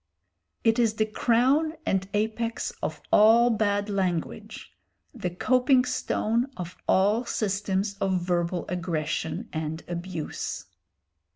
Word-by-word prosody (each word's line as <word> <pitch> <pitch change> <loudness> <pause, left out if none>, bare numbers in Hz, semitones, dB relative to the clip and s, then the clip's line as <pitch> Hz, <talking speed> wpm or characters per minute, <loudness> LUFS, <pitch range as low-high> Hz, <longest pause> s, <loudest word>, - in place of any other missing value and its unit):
It 225 0 +3
is 225 -2 +2
the 215 - +2
crown 255 +8 +2
and 190 0 0
apex 220 +2 -1
of - - -4
all 230 +3 +6
bad 205 -2 +1
language, 180 - -3 0.4
the 180 - -3
coping 255 +7 +3
stone 235 0 0
of 180 -1 -6
all 205 +5 +3
systems 200 -2 -1
of 190 -1 +1
verbal 175 0 -1
aggression 165 +2 -2
and 160 0 -4
abuse. 175 -2 -5
200 Hz, 110 wpm, -26 LUFS, 175-230 Hz, 0.4 s, all